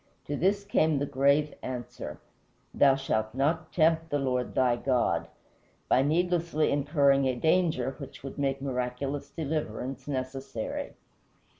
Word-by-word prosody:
To 145 - -3
this 195 +6 +1
came 160 -7 +2
the 140 - 0
grave 140 +2 +2
answer, 125 -3 -6 0.5
"Thou 135 -1 +5
shalt 110 -5 -1
not 160 +4 0
tempt 165 0 +2
the 145 - +1
Lord 130 -3 -1
thy 125 -2 +3
God," 120 -10 +1 0.6
by 130 - +4
needlessly 170 +1 +1
incurring 140 -1 +3
a 130 - 0
danger 160 -3 +1
which 140 - -9
would 140 +1 -7
make 135 -1 -1
miraculous 130 +2 -3
deliverance 135 -4 -4
necessary. 130 -4 -4
140 Hz, 130 wpm, -28 LUFS, 130-155 Hz, 0.6 s, Thou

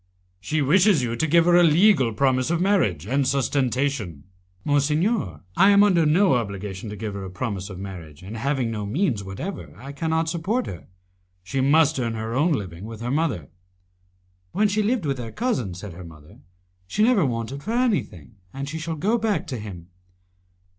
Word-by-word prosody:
"She 150 +9 -1
wishes 180 +1 +4
you 115 -1 -2
to 160 +7 0
give 165 +2 +4
her 175 0 +5
a 175 - +7
legal 165 - +4
promise 130 +3 +1
of 170 0 +1
marriage, 170 - +1
and 135 +4 +1
sustentation." 130 - -1 0.4
"Monsignor, 150 - +1
I 195 - +6
am 200 0 +6
under 175 -6 +4
no 180 +2 +4
obligation 100 -3 -3
to 105 - -6
give 105 0 -5
her 100 -1 -5
a 95 - -6
promise 95 -1 -4
of 95 - -8
marriage, 90 -5 -9
and 100 +4 -8
having 125 0 -1
no 105 -2 -4
means 125 - 0
whatever 100 - -7
I 135 +2 -9
cannot 160 +3 -1
support 180 +10 -1
her. 90 - -8 0.6
She 95 +9 -2
must 150 +2 +4
earn 115 -2 -2
her 110 +1 -4
own 155 +6 +2
living 95 - -5
with 110 0 -8
her 120 +1 -2
mother" 135 - -1 1.0
"When 210 +2 +3
she 205 +1 0
lived 215 -3 0
with 135 -2 -1
her 115 -2 -6
cousin," 130 - -2
said 95 0 -8
her 90 +2 -10
mother, 80 +1 -14 0.5
"she 210 - +1
never 230 -5 +4
wanted 125 +1 -3
anything, 215 - -1
and 135 +4 -5
she 160 +3 -5
shall 165 +1 -4
go 210 +10 +1
back 210 -7 0
to 125 - -5
him." 90 -5 -9
135 Hz, 185 wpm, -24 LUFS, 105-170 Hz, 1.0 s, a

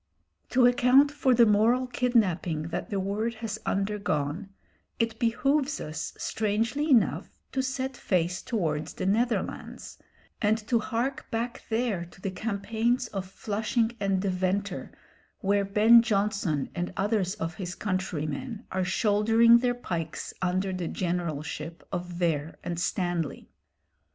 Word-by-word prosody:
To 255 -1 +4
account 250 +3 +5
for 275 -3 +2
the 235 0 +7
moral 225 +4 +3
kidnapping 185 -11 +1
that - - -4
the 200 - -1
word 210 +4 -1
has 220 -1 -5
undergone, 195 -4 -1 0.5
it 230 -1 -1
behoves 275 +5 +1
us, 155 +1 -5
strangely 225 +8 -1
enough, 245 -6 +2
to 265 - 0
set 265 0 -3
face 180 -4 0
towards 160 -10 -2
the - - -3
Netherlands, 230 +5 -1 0.4
and 215 0 +3
to 235 -1 +3
hark 240 +5 -2
back 235 +1 -3
there 220 -6 0
to 175 - -17
the 195 0 -3
campaigns 225 +4 -1
of 195 -2 -4
Flushing 220 +4 -1
and 195 -1 +1
Deventer, 190 0 -1 0.5
where 200 +1 +2
Ben 215 +4 +7
Jonson 200 - 0
and 175 -1 -3
others 200 -2 0
of 165 -5 -3
his 185 -2 -5
countrymen 185 - -3
are 185 0 0
shouldering 225 +4 +4
their 245 0 +1
pikes 165 -9 -4
under 185 +1 0
the 180 -2 -3
generalship 165 -2 -3
of 180 -1 -3
Vere 165 -3 -1
and 170 -1 -3
Stanley. 175 -4 -2
205 Hz, 130 wpm, -28 LUFS, 180-235 Hz, 0.5 s, the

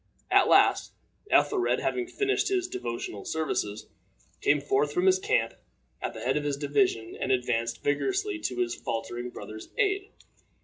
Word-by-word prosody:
At - - +6
last, - - +4 0.4
Ethelred, 385 -4 +3
having 365 -1 -1
finished 405 +2 0
his 370 -2 0
devotional 120 - -5
services, 125 -10 -2 0.6
came 145 - +3
forth 145 +1 +1
from 180 +5 0
his 190 0 +5
camp 115 -10 +1 0.5
at - - -4
the - - -7
head 130 +4 +1
of 150 - -1
his 145 -1 -1
division, 145 - 0
and - - -2
advanced 120 -2 0
vigorously 385 - 0
to 125 - -3
his 120 -1 0
faltering 120 +1 -4
brother's 110 -2 -9
aid. 400 0 +1
145 Hz, 150 wpm, -28 LUFS, -, 0.6 s, At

